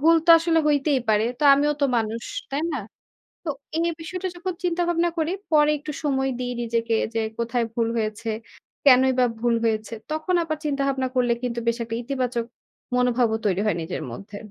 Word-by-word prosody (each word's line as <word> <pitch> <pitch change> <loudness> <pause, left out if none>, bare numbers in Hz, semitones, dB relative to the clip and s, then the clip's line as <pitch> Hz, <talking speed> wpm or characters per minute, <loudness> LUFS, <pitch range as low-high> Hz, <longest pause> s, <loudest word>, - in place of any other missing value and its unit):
ভুল 330 +3 +6
তো - - +7
আসলে 330 0 +2
হইতেই 285 -2 +2
পারে। 215 0 +3
তো - - -5
আমিও 295 +1 +2
তো - - +4
মানুষ, 225 +1 -1 0.3
তাই 280 +3 -1
না? - - -1 0.7
তো 315 - -1 0.3
এই 335 +1 +1
বিষয়টা 365 +3 -4
যখন 365 +1 -3
চিন্তা 350 0 +1
ভাবনা 345 0 +2
করি 320 +3 0 0.2
পরে 300 0 +5
একটু 300 +1 -6
সময় 270 -2 +1
দিই 245 0 -2
নিজেকে 230 0 0 0.2
যে 225 - +1 0.2
কোথায় 235 +1 0
ভুল 230 -1 +1
হয়েছে, 220 +1 -2 0.6
কেনই 260 -1 +6
বা 250 - +5 0.2
ভুল 240 -1 +2
হয়েছে। 220 0 -1 0.2
তখন 315 +4 -1
আবার 310 -1 -2
চিন্তা 280 -2 0
ভাবনা 265 -1 0
করলে 245 -2 +2
কিন্তু 240 -1 -2
বেশ 235 +1 +1
একটা 230 0 -4
ইতিবাচক 250 -2 -2 0.5
মনোভাবও 245 -2 +2
তৈরি 190 0 +1
হয় 180 - +1
নিজের 170 +3 -4
মধ্যে। 200 - -9
255 Hz, 185 wpm, -24 LUFS, 230-305 Hz, 0.7 s, তো